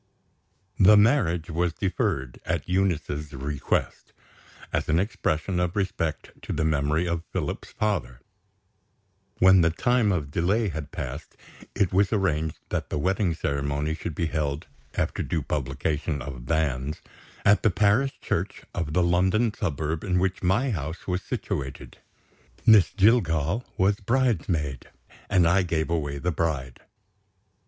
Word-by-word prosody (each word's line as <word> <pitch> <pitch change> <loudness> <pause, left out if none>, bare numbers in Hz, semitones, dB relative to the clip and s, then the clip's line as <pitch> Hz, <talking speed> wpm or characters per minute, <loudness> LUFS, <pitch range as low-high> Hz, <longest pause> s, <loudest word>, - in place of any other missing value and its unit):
The 105 +2 +8
marriage 95 - +3
was 85 +1 0
deferred, 70 -9 -2
at - - -2
Eunice's 80 -5 -1
request, 70 +1 -2 0.6
as - - -1
an 80 +2 +3
expression 90 -4 -1
of 90 -1 -1
respect 95 -5 -2
to - - -6
the 80 - 0
memory 75 +2 +1
of 85 -1 -1
Philip's - - -4
father. 100 - -2 1.2
When 95 0 +6
the 80 - +4
time 120 +5 +2
of 75 -6 -2
delay 100 +8 +1
had 75 -3 -5
passed, - - -7 0.4
it 100 -3 +1
was 100 +1 +3
arranged 80 -7 0
that - - -2
the - - -2
wedding 95 +2 +1
ceremony 70 +1 -1
should 80 0 -5
be 85 - 0
held 75 -2 -2 0.3
after - - -1
due 80 -4 -2
publication 75 +3 -2
of 65 -2 -8
Banns 75 -2 -1 0.5
at 105 +1 +5
the 110 - +4
parish 105 +8 +2
church - - -2
of 85 -4 -3
the 90 - +3
London 95 +6 +2
suburb 80 -4 -2
in 90 -3 0
which 95 +1 0
my 100 +9 +2
house 80 -2 -4
was 90 0 -1
situated. 65 -4 -5 0.7
Miss 105 -8 +7
Jillgall 95 - +2
was 100 +2 +3
bridesmaid, 90 - 0 0.4
and 90 -3 +4
I 90 +3 +4
gave 85 -3 -1
away 75 -4 -1
the 90 +5 -1
bride. 75 -6 -2
85 Hz, 140 wpm, -26 LUFS, 75-95 Hz, 1.2 s, The